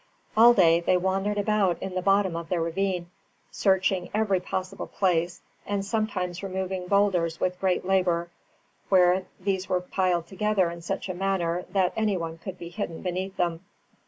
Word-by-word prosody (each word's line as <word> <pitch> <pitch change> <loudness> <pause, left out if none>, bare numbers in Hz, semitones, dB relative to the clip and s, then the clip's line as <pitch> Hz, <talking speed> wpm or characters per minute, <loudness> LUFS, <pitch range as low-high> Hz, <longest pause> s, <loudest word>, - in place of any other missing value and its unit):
All 235 +2 +7
day 170 -3 +5
they 175 +1 +2
wandered 195 +3 0
about 205 -3 +2
in 190 -1 -5
the 185 - -1
bottom 195 -2 +2
of 165 -1 -5
the 180 - 0
ravine, 175 +1 -2 0.4
searching 190 -2 +1
every 210 -3 +2
possible 185 +2 -4
place, 175 -2 0 0.2
and 200 -1 -2
sometimes 195 -4 -2
removing 190 -1 -3
boulders 180 -5 +2
with 180 0 -1
great 185 -2 0
labour, 180 -3 +1 0.6
where 185 0 +4
these 190 0 -2
were 180 - +2
piled 180 -2 0
together 195 -2 0
in 170 0 -8
such 170 - -3
a 185 - -3
manner 180 -2 -1
that 190 -2 +1
any 215 -3 +1
one 165 -1 -5
could 185 +1 -7
be 170 - -8
hidden 175 -3 -5
beneath 185 +1 -3
them. 170 -1 -1
185 Hz, 165 wpm, -26 LUFS, 175-195 Hz, 0.6 s, All